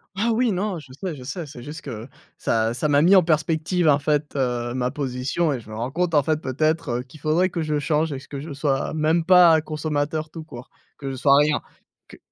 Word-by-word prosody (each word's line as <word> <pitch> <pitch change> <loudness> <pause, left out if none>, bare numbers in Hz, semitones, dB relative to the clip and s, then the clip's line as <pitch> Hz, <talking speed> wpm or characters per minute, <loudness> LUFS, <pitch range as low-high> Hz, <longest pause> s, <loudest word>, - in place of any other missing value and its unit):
Ah 230 +4 +1
oui, 235 0 +2
non, 190 -1 -2
je 135 -3 -15
sais, 175 +2 -5
je 130 - -10
sais, 155 +5 -5
c'est 130 -4 -11
juste 150 +3 -8
que 115 -3 -7 0.3
ça 115 0 0
ça 150 +5 -1
m'a 145 0 +4
mis 185 +5 +6
en 185 - +8
perspective, 160 +2 +1
en 145 -1 +5
fait, 150 0 -1
heu, 120 -2 -1
ma 125 -1 -1
position 140 +3 -1
et 125 - -3
je 110 - -15
me 110 - -7
rends 120 +4 -3
compte, 175 +1 -1
en 145 - +4
fait, 155 +1 0
peut-être, 155 +3 0
heu, - - -5
qu'il 135 +4 -16
faudrait 160 +5 +2
que 170 - -3
je 155 -1 -1
change 150 +1 0
et 135 - -5
que 140 0 -8
je 150 0 -7
sois 140 0 -1
même 160 +2 +1
pas 175 -3 +7
consommateur 155 0 -2
tout 160 - -8
court, 125 -6 -11 0.3
que 135 -2 -5
je - - -5
sois 140 +2 +4
rien, 150 0 +3 0.5
que - - -14
150 Hz, 240 wpm, -23 LUFS, 135-165 Hz, 0.5 s, en